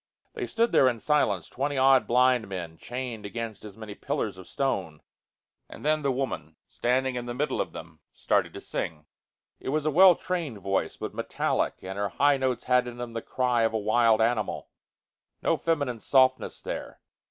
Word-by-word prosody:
They 420 -6 -4
stood 230 +1 +1
there 130 - +5
in 120 -2 -3
silence, 105 - +1
twenty 140 - -2
odd 135 0 +5
blind 125 -1 +3
men, 85 -4 -6
chained 120 -3 -5
against 110 +1 -5
as 105 -1 -10
many 110 -2 -8
pillars - - -3
of - - -11
stone; - - -2 0.7
and - - -11
then 155 0 +2
the 140 -1 +1
woman, 125 - -3
standing 130 +2 0
in 120 0 -4
the 120 - -4
middle 150 +4 0
of - - -4
them, 80 -1 -10
started - - 0
to - - -7
sing. 75 -2 -4 0.5
It - - -5
was 150 +2 0
a 155 - +2
well 180 +3 +8
trained 170 - -3
voice, 100 0 -2
but - - -5
metallic, - - -1
and 95 +1 -5
her 100 0 0
high 140 +6 +3
notes 130 -2 -1
had 125 -1 +3
in 120 0 -7
them 120 -1 -6
the 115 - -3
cry 125 -1 0
of 115 0 +2
a - - +1
wild 110 +1 +3
animal. 115 -1 0 0.7
No - - +3
feminine 145 -8 -1
softness 130 +2 +2
there. - - -6
125 Hz, 185 wpm, -27 LUFS, 110-135 Hz, 0.7 s, well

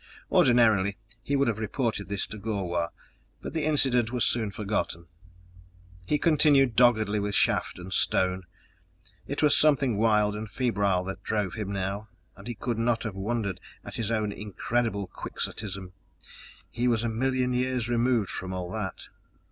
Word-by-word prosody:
Ordinarily 110 -6 +4 0.2
he 140 +5 -1
would 140 -1 +2
have 110 -2 -1
reported 110 -1 -2
this 100 -1 -1
to 105 - -8
Gor 100 -3 -2
wah, 85 -1 -1 0.5
but - - -7
the 160 -2 -1
incident 130 -6 +3
was 125 -2 +2
soon 110 -3 +1
forgotten. 100 -4 -3 1.0
He 150 - +2
continued 145 -6 +4
doggedly 110 -4 +4
with 100 0 -2
shaft - - +2
and 90 +1 -7
stone. 95 -1 +1 0.8
It 140 +2 -2
was 150 - +5
something 140 -7 +3
wild 105 -2 +3
and 105 0 -5
febrile 100 -6 +1
that 95 +1 -6
drove 105 -4 -1
him 105 -3 -4
now, 100 +2 -3 0.3
and 100 - -12
he 120 - -4
could 115 +2 -3
not 115 0 +1
have 115 -4 -4
wondered 100 -1 -2 0.3
at - - -7
his 115 -2 -2
own 110 -2 0
incredible 105 +1 -2
quixotism 95 0 -5 0.8
he 120 +1 0
was 115 -2 +2
a - - 0
million 125 +2 0
years 125 -1 0
removed 120 -3 +1
from 95 - -5 0.2
that! 105 -3 -5
110 Hz, 155 wpm, -27 LUFS, 100-120 Hz, 1.0 s, was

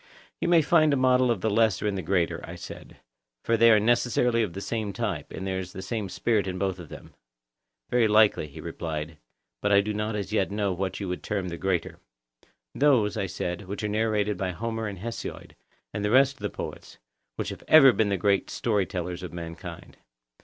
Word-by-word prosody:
You - - -1
may 170 -2 +5
find 155 0 +4
a - - +2
model 130 -1 +3
of 115 -6 0
the 110 - +1
lesser 110 -2 +2
in 105 - +1
the 95 - -3
greater, 85 0 0
I - - -8
said; - - -10 0.5
for 115 - +3
they 115 +1 +6
are 110 -2 +6
necessarily 120 +1 +2
of 105 -6 -2
the 95 - -5
same 105 -1 -3
type, - - -3
and 95 - -6
there 95 -1 -2
is 90 -1 -7
the 95 - -7
same 100 0 -3
spirit 110 0 0
in 90 -1 -3
both 95 -1 -2
of 85 -4 -10
them. - - -11 0.8
Very 120 -2 +4
likely, 105 -6 +4
he 70 - -12
replied; 80 -1 -5 0.4
but 105 - +1
I 100 - +6
do 105 +1 -1
not 105 +1 -2
as 105 0 -4
yet 95 -3 +1
know 100 -1 -1
what 95 +1 -3
you 100 - -4
would 90 0 -4
term 95 -3 -3
the 85 - -5
greater. 95 -3 -1 0.7
Those, 130 -8 +3
I 95 - -1
said, 90 +1 -4
which 100 +3 -5
are - - 0
narrated 105 -1 0
by 95 -1 -2
Homer 115 +2 -3
and 100 -1 -6
Hesiod, 115 +5 -6 0.4
and 105 - -3
the 105 - +1
rest 135 +3 +5
of 140 - -25
the - - -2
poets, - - -8 0.4
who - - -1
have - - -7
ever 135 -5 +8
been 110 -2 +1
the 100 - +1
great 100 +1 +1
story 105 -5 0
tellers 90 -1 -4
of 90 - -6
mankind. 85 -1 -8
105 Hz, 215 wpm, -26 LUFS, 95-115 Hz, 0.8 s, ever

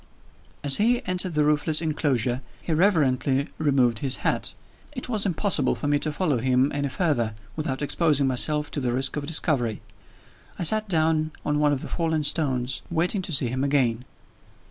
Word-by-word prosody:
As 140 -2 +6
he 240 +4 +2
entered 180 -3 -1
the 150 - +3
roofless 150 +1 +2
inclosure, 135 -6 -1 0.2
he 165 - -3
reverently 140 -6 +1
removed 130 -7 +2
his 130 0 -1
hat. - - -1 0.4
It 250 - -4
was 210 -4 +2
impossible 195 +2 +1
for 145 - -4
me 145 0 +2
to 155 - -2
follow 150 -5 0
him 130 +3 +2
any 140 0 -2
further, 130 - -1 0.2
without 145 -3 -3
exposing 145 -2 +2
myself 145 +3 0
to - - -2
the 125 -3 -1
risk 130 +1 -1
of 145 -1 -4
discovery. 140 -8 +1 0.8
I - - -3
sat 215 +4 +2
down 155 -2 +2
on 150 0 0
one 150 -1 +3
of 140 -2 -1
the - - -6
fallen 160 -2 -1
stones, 130 -4 0
waiting 175 +4 0
to 180 - -7
see 135 -5 +1
him 130 +2 -2
again. 130 -4 0
150 Hz, 175 wpm, -24 LUFS, 130-165 Hz, 0.8 s, As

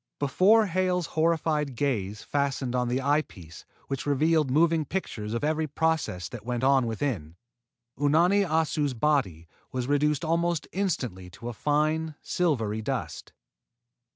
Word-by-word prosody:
Before 195 +10 +4
Hale's 180 -1 0
horrified 155 -4 +1
gaze 110 -7 -2
fastened 140 -3 -1
on 125 -1 +1
the 125 +2 0
eye 145 +2 +3
piece 85 - -13 0.2
which 135 +1 -4
revealed 155 +1 +2
moving 160 +3 +3
pictures 115 - -4
of 115 - -3
every 155 +1 0
process 150 - -1
that - - -8
went 120 +1 -3
on 135 -2 +4
within, 110 - -3 0.6
Unani 170 +8 +4
Assu's 155 -5 0
body 110 - 0 0.2
was 125 -1 -2
reduced 150 +3 +1
almost 170 0 0
instantly 125 - -2
to 115 +7 -8
a - - -5
fine, 155 +4 0
silvery 115 -12 0
dust. - - -4
145 Hz, 135 wpm, -27 LUFS, 120-160 Hz, 0.6 s, Before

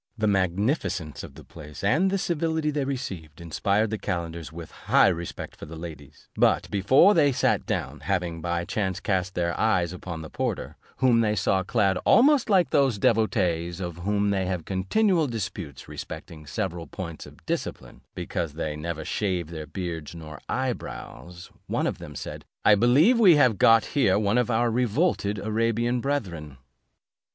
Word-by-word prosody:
The 110 - 0
magnificence 95 - 0
of - - -10
the - - -12
place, 75 +3 -11
and 155 - +3
the 195 - 0
civility 160 -3 -1
they 145 -2 -1
received, 95 - -5
inspired 100 +6 0
the 110 - -2
calenders 85 -2 -4
with 80 -1 -9
high - - +3
respect 85 -1 -5
for - - -10
the 80 - -9
ladies: 75 -3 -10
but, - - +3
before 130 - +5
they 145 -5 +4
sat 125 - +1
down, - - -3
having 90 -4 -2
by 85 0 -2
chance 95 -3 -2
cast 95 -1 -1
their 85 -1 0
eyes 90 -6 +2
upon 85 -3 -7
the 80 - -8
porter, - - -3 0.2
whom 125 -3 +4
they 105 -1 +1
saw 95 0 +1
clad 95 -1 +1
almost 275 -1 +5
like 185 -4 +3
those 135 -6 +3
devotees 90 -6 +1
with 85 -2 -5
whom 100 +2 0
they 95 -2 0
have 90 -3 -3
continual 160 - +1
disputes 100 - -6
respecting 75 -2 -8
several 85 -2 -3
points 85 -3 -7
of - - -17
discipline, - - -4
because 85 -3 -3
they 75 -1 -3
never 80 0 -5
shave 90 -6 -2
their 80 -2 -6
beards 85 -2 -5
nor 75 -2 -9
eye 130 -1 0
brows; 90 -5 -10 0.2
one - - -1
of - - -2
them 75 - -9
said, - - -7 0.2
"I 105 - +7
believe 135 - +5
we 190 -7 +7
have 125 -8 +3
got 115 -1 +6
here 140 -8 +2
one 105 +3 +2
of 125 - 0
our 120 0 +2
revolted 120 - +1
Arabian 115 +3 0
brethren." 90 - -3
100 Hz, 170 wpm, -26 LUFS, 85-120 Hz, 0.2 s, I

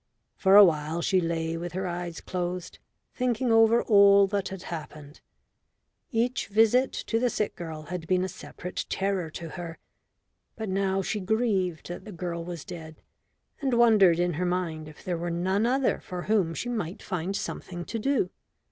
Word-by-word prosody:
For 190 0 +4
a 205 0 +11
while 160 0 0
she 185 -2 +3
lay 165 -1 -1
with 175 +1 -5
her 190 +1 -2
eyes 175 -1 -4
closed, 180 -1 -4 0.3
thinking 250 -1 0
over 225 +1 +5
all 200 -2 +7
that 195 0 -2
had 190 -1 -7
happened. 150 -3 -8 0.9
Each 240 +1 0
visit 225 +5 +4
to 225 - -2
the 250 +1 +2
sick 210 -2 -2
girl 160 -3 -7
had 165 +1 -6
been 185 0 +2
a - - -1
separate 180 -1 -7
terror 190 -4 -1
to 165 +1 -7
her, 170 0 -7 0.8
but 220 -3 -5
now 195 0 0
she 210 +2 -2
grieved 195 -5 0
that 175 - -7
the 215 - -8
girl 170 -2 -4
was 170 -3 -7
dead, 160 -3 -9 0.6
and 265 -3 +1
wondered 215 -8 +6
in 175 0 +1
her 175 +4 -1
mind 170 -4 -2
if 155 - -13
there 175 -2 -2
were 175 +1 -2
none 190 +6 +1
other 265 +1 +1
for 180 -1 -6
whom 195 -7 +1
she - - -4
might 205 -7 -4
find 185 0 -3
something 175 -3 -5
to 230 - -4
do. 245 -6 +1
185 Hz, 175 wpm, -27 LUFS, 170-210 Hz, 0.9 s, a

